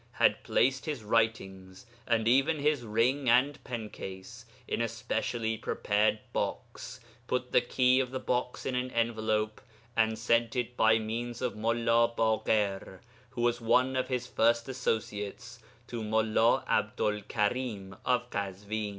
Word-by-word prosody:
had - - +3
placed 130 +3 +1
his 145 -7 -3
writings, 95 -3 -1 0.2
and 115 -2 +1
even 135 +6 +3
his 145 -1 +1
ring 120 +4 +1
and 130 +5 +3
pen 115 -3 -5
case, 105 +5 -9 0.2
in - - -1
a 115 - +1
specially 115 -1 -2
prepared 105 0 +1 0.2
box, - - -4 0.3
put 125 0 -2
the - - +5
key 125 +1 +3
of 130 -2 0
the 130 +1 -4
box 125 0 -2
in 130 - -1
an 125 0 -1
envelope, 110 -2 0 0.3
and 110 -1 +2
sent 115 +1 +1
it 125 -1 -2
by 110 -1 +4
means 115 +2 -4
of 125 -2 -2
Mullā 115 +1 +2
Baḳir, 105 -4 0 0.3
who 120 - -5
was 120 0 +1
one 125 +3 +3
of 130 0 0
his 125 -1 -2
first 115 -1 +2
associates, 115 -2 -3 0.3
to 120 -2 -5
Mullā 110 +1 +2
'Abdu'l 105 0 0
Karim 105 -3 -2
of 125 -1 +1
Kazwin. 100 +2 -3
115 Hz, 145 wpm, -30 LUFS, 110-125 Hz, 0.3 s, the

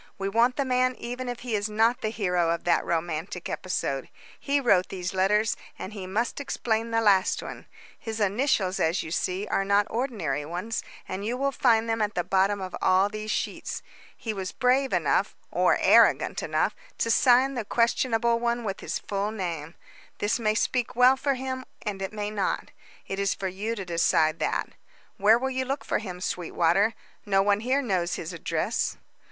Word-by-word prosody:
We 195 0 -2
want 235 +4 +3
the 280 - 0
man 255 0 +2
even 245 +1 -5
if 245 -1 -5
he 245 -2 -4
is 210 0 0
not 225 +3 +2
the 215 - 0
hero 180 -6 0
of 170 0 -1
that 175 - +2
romantic 170 +2 -3
episode. 140 -7 -3 0.3
He 285 +1 +1
wrote 200 -9 +3
these 185 -1 -4
letters, 210 +4 +2 0.2
and 195 - -7
he 195 -3 -6
must 225 +8 -1
explain 230 -4 -1
the 225 0 +1
last 200 -3 +3
one. - - -8 0.3
His 225 -1 -5
initials, 205 -2 +1
as 165 +3 +1
you 155 - -7
see, 185 +3 -1
are 195 - 0
not 200 +1 +3
ordinary 205 - -2
ones, 180 +9 -3 0.3
and 190 +2 -4
you 235 +4 -2
will 275 +1 0
find 230 -4 +3
them 225 -1 0
at 210 -1 -1
the 175 - 0
bottom 195 +3 +2
of 185 -1 -5
all 190 +2 +4
these 215 0 -6
sheets. - - -3 0.3
He 225 - -4
was 190 -2 -4
brave 260 +1 +2
enough - - +1 0.2
or - - +3
arrogant - - +4
enough - - 0 0.2
to 230 - +1
sign 255 +3 +5
the 240 -4 -2
questionable 235 +1 +1
one 235 0 0
with 195 -3 -3
his - - -3
full 200 +1 -2
name. 170 -6 -4 0.4
This 205 +3 0
may 215 -2 +1
speak 245 +1 0
well 250 +2 +6
for 275 +1 0
him, 260 0 -4 0.2
and 200 -3 -4
it 190 - -3
may 210 -1 -4
not. 205 -2 -2 0.3
It 195 - -4
is 200 0 +1
for 195 - -3
you 205 +5 -3
to 195 -4 -5
decide 165 -2 +2
that. - - -1 0.5
Where 210 +3 +5
will 265 +2 -2
you 260 0 -1
look 275 +2 -3
for - - 0
him, 180 -4 -7
Sweetwater? 180 +4 +1 0.3
No 195 -2 +2
one 205 0 +3
here 260 +5 +1
knows 180 -6 0
his 165 +2 -6
address." 170 - -1
210 Hz, 190 wpm, -26 LUFS, 185-235 Hz, 0.5 s, well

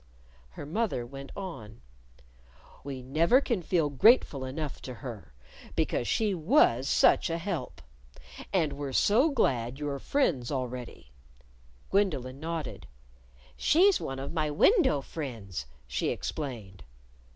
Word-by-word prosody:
Her - - -6
mother 170 - -1
went 135 +2 -9
on: 115 - -8 1.0
"We 135 -2 -6
never 165 - +4
can 235 -8 -1
feel 165 -3 +1
grateful 145 - +4
enough 145 +2 -5
to 125 - -7
her, 105 - -9 0.4
because 120 - 0
she 215 -3 +1
was 160 - +3
such - - +4
a 165 - -1
help. 170 -6 -5 0.7
And 160 -6 +1
we're 140 -1 -5
so 235 - +4
glad 125 - 0
you're 145 -1 -3
friends 150 - 0
already." 125 - -5 0.8
Gwendolyn 140 -10 0
nodded. 160 -3 -5 0.7
"She's 380 +5 +4
one 135 - -4
of 135 +3 -5
my 155 -2 0
window 260 - +4
friends," 110 - -6 0.2
she - - -2
explained. 115 - -5
145 Hz, 120 wpm, -29 LUFS, 125-180 Hz, 1.0 s, never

